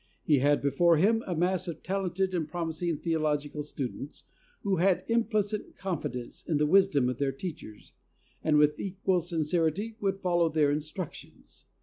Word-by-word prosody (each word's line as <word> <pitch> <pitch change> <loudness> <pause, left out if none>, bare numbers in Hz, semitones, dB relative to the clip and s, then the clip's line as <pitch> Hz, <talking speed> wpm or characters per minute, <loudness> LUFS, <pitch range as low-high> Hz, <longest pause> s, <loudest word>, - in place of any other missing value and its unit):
He 150 -3 +3
had 145 +2 +2
before 165 +4 +4
him 220 +7 +3
a 180 - -1
mass 180 +3 +1
of 165 -2 -6
talented 190 0 -1
and 165 -4 -1
promising 165 0 -2
theological 150 -3 -1
students, 140 -1 -6 0.4
who 195 -2 +1
had 185 +2 +3
implicit 215 -3 0
confidence 145 -10 -4
in 160 - +1
the 150 - +2
wisdom 160 -6 +4
of 125 -1 -2
their 140 -1 +1
teachers, 135 - -8 0.5
and 155 -1 +3
with 150 0 +3
equal 190 -1 0
sincerity 170 +5 -1
would 195 -1 -1
follow 175 -3 +2
their 150 -2 +2
instructions. 155 +3 -7
165 Hz, 150 wpm, -29 LUFS, 150-190 Hz, 0.5 s, before